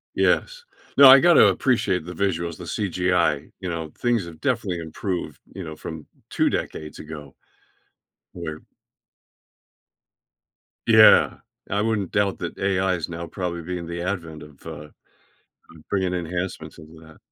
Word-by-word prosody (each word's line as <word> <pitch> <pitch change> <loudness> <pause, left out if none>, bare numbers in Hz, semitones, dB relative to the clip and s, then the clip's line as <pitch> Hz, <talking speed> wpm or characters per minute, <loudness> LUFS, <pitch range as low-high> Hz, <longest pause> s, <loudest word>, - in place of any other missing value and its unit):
Yes. - - +1 0.3
No, 140 -1 +10
I 135 +1 +10
gotta 175 +3 +6
appreciate 100 - +1
the 90 - -7
visuals, 85 -5 -2
the - - -9
CGI, 90 -6 0
you 95 - -5
know, 80 -2 -4
things 120 -6 0
have 85 -2 -11
definitely 110 -9 -1
improved, 85 +3 -5
you 95 - -7
know, 80 -2 -7
from 80 0 -8 0.2
2 - - +1
decades 75 -1 -5
ago. 75 -3 -10 1.0
Where 80 -3 -6 2.3
Yeah. 110 -1 +7 0.3
I 100 +2 0
wouldn't 105 -4 -1
doubt 100 -1 +1
that 85 - -5
AI 95 -1 +1
is 85 -3 -3
now 85 0 -6
probably 85 0 -4
being 85 0 -5
the 85 0 -5
advent 85 -5 -4
of, 75 -1 -16
uh, 75 -2 -8 1.0
bringing 95 -2 0
enhancements 90 +1 -4
into 80 0 -14
that. 80 -1 -16
90 Hz, 140 wpm, -23 LUFS, 80-100 Hz, 2.3 s, No